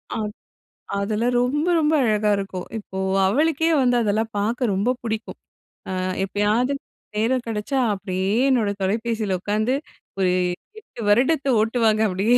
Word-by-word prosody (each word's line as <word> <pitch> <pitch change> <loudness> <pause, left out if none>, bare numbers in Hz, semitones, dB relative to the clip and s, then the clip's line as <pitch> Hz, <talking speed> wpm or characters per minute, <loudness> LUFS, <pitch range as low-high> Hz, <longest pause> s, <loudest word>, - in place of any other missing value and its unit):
அ - - -2 0.8
அதெல்லாம் 215 +4 0
ரொம்ப, 290 +6 0
ரொம்ப 310 0 +2
அழகா 215 -2 +2
இருக்கும். 195 -2 -4
இப்போ 190 -2 -8 0.3
அவளுக்கே 310 +9 +2
வந்து 245 -1 +3
அதெல்லாம் 220 +1 0
பாக்க 230 +5 0
ரொம்ப 225 +7 +1
புடிக்கும். 220 -1 -4 0.5
அ - - -2 0.3
எப்பயாவது 210 +7 +1 0.4
நேரம் 240 +3 +1
கெடைச்சா 225 +5 -1
அப்டியே 190 -1 -2 0.2
என்னோட 235 -6 +2
தொலைபேசியில 220 0 -1
உக்காந்து, 215 +6 0 0.4
ஒரு 185 -1 +3 0.5
8 400 - -12
வருடத்த 270 +6 +3
ஓட்டுவாங்க 220 -1 +2
அப்படியே, 205 +6 +2
220 Hz, 125 wpm, -23 LUFS, 205-250 Hz, 0.8 s, வந்து